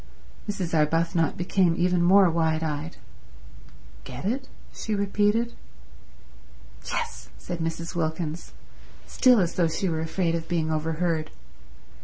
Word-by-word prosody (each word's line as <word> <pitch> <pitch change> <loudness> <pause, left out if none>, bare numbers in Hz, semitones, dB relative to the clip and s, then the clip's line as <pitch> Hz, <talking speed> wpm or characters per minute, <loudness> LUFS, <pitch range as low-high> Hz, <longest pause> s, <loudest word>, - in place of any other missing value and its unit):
Mrs. 185 -5 -3
Arbuthnot 165 +1 +2
became 175 -1 +2
even 180 0 +2
more 190 +2 +6
wide 160 -1 +1
eyed. 155 +1 -4 1.1
"Get 125 - -8
it?" 260 +6 -1 0.3
she 220 - -3
repeated. 205 +4 +1 1.4
"Yes," 60 0 -4
said 175 -1 -6
Mrs. 165 +1 -3
Wilkins, 160 -1 -3 0.5
still 250 -3 +4
as 175 -3 +1
though 175 -2 +2
she 160 +4 -1
were 160 -2 -1
afraid 165 +1 0
of 165 -1 -3
being 160 -2 0
overheard. 160 +1 -1
170 Hz, 120 wpm, -26 LUFS, 160-185 Hz, 1.4 s, more